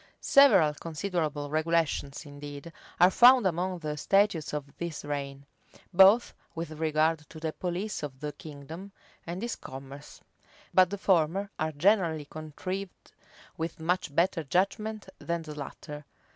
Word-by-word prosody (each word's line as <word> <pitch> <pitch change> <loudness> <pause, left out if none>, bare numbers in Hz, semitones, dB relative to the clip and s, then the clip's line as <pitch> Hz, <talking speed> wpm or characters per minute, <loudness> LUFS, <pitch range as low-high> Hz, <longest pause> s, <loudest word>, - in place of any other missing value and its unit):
Several 200 - +6
considerable 155 -3 -3
regulations, 155 -2 0
indeed, 145 +2 -9 0.3
are 180 +2 +7
found 245 +1 +7
among 180 +1 0
the 155 -3 -4
statutes 195 -2 +2
of 145 -2 -6
this 170 -4 -5
reign, 140 -1 -5 0.5
both 195 +6 +6 0.2
with 165 -1 -5
regard 155 0 +1
to 160 - -10
the 160 -1 -3
police 185 +4 -3
of 135 -3 -7
the 150 0 -4
kingdom, 160 +7 -10 0.3
and 175 +5 -5
its 235 - -2
commerce: 135 +2 -10 0.5
but 185 -1 +6
the 200 - -4
former 190 +2 +1
are 155 0 0
generally 165 -1 +2
contrived 180 +6 -7 0.5
with 165 +1 -4
much 165 -2 -1
better 170 -1 +2
judgment 200 +7 -1
than 170 -1 -3
the 155 -1 -8
latter. 150 0 -8
165 Hz, 135 wpm, -29 LUFS, 150-185 Hz, 0.5 s, are